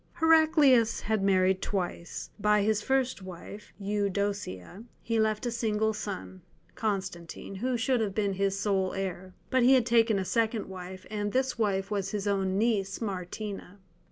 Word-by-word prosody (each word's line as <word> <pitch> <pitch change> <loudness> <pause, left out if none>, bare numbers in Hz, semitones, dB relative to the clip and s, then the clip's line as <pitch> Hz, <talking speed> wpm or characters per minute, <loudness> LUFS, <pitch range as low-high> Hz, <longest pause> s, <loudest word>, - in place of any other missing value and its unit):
Heraclius 315 -8 +4
had 220 -1 0
married 190 -1 +3
twice; 180 -3 -4
by 210 0 +3
his 215 0 +1
first 265 -3 0
wife, 190 +3 -10
Eudocia, 200 - -2 0.2
he 230 -1 -1
left 215 +1 +1
a 240 - -1
single 220 -2 0
son, 195 -3 -6 0.3
Constantine, 195 -5 -4
who 245 +6 -1
should 245 +1 +1
have 200 -3 -2
been 200 -2 +1
his 195 0 0
sole 195 -2 0
heir. 185 -1 -4 0.2
But 260 - +3
he 255 +2 +6
had 250 -3 +3
taken 230 -2 +4
a 190 - -1
second 225 +1 0
wife, 185 0 -8
and 205 -1 -2
this 260 -1 0
wife 195 -2 0
was 200 -2 -1
his 205 0 -3
own 195 -1 +1
niece 205 -3 0
Martina. 200 -1 -5
205 Hz, 155 wpm, -29 LUFS, 190-225 Hz, 0.3 s, he